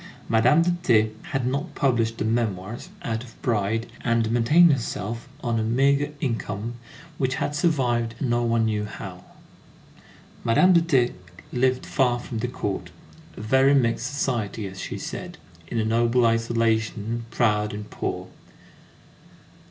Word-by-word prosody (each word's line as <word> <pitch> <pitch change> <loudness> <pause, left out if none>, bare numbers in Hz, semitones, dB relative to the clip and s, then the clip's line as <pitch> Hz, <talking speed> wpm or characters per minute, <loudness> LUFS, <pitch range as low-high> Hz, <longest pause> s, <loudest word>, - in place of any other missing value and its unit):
Madame 125 +9 +4
de 175 - +2
T. 110 -8 +3 0.2
had 135 -4 -1
not 140 +3 -2
published 115 -4 +1
the 105 - -2
memoirs, 110 -2 -2
out 115 0 -2
of 120 -3 -15
pride, 115 -1 0 0.2
and 115 -2 +1
maintained 150 +8 +5
herself 115 0 -4
on 120 -2 0
a - - 0
meagre 140 +5 +2
income 115 -3 -3 0.5
which 130 -1 +1
had 145 - -2
survived 125 -8 +1
no 120 -3 +1
one 115 -1 +2
knew 105 -1 0
how. 105 - -8 1.2
Madame 150 +11 +5
de 170 - +6
T. 135 -8 +2 0.4
lived 130 +1 +1
far 125 -3 +2
from 120 -2 -5
the 125 - -1
Court; 105 -5 -4 0.5
"a - - -6
very 130 +5 +4
mixed 120 -1 +1
society," 120 -6 -2
as 95 -1 -7
she - - -5
said, - - -6 0.3
in 115 - -4
a 110 - +1
noble 120 +2 +3
isolation, 115 0 0
proud 105 -3 +1
and 105 0 -6
poor. - - -4
115 Hz, 145 wpm, -24 LUFS, 110-130 Hz, 1.2 s, de